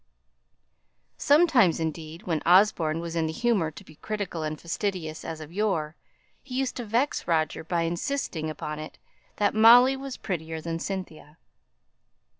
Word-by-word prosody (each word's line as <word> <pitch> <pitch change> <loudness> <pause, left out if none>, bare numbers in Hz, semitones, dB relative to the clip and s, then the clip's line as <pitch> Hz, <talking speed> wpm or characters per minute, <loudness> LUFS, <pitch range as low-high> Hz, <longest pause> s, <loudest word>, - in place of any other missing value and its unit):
Sometimes, 285 - +4
indeed, 160 0 -5
when 165 -4 -1
Osborne 170 -3 +4
was 170 0 -5
in 165 -1 +1
the - - -2
humour 200 -2 +1
to 160 - -12
be 155 - -17
critical 205 -5 -4
and 155 -1 -4
fastidious 170 -3 -3
as 160 -1 -6
of 155 0 -10
yore, 175 -7 -1 0.5
he 250 - -9
used 265 -1 -1
to 245 - -4
vex 235 +3 0
Roger 160 -3 0
by 170 +1 -1
insisting 170 - -2
upon 150 0 -5
it 155 - -9 0.4
that 205 -1 +1
Molly 240 +4 +7
was 270 -1 -7
prettier 160 -4 -4
than 165 +1 -4
Cynthia. 165 -5 -6
170 Hz, 150 wpm, -26 LUFS, 160-215 Hz, 0.5 s, Molly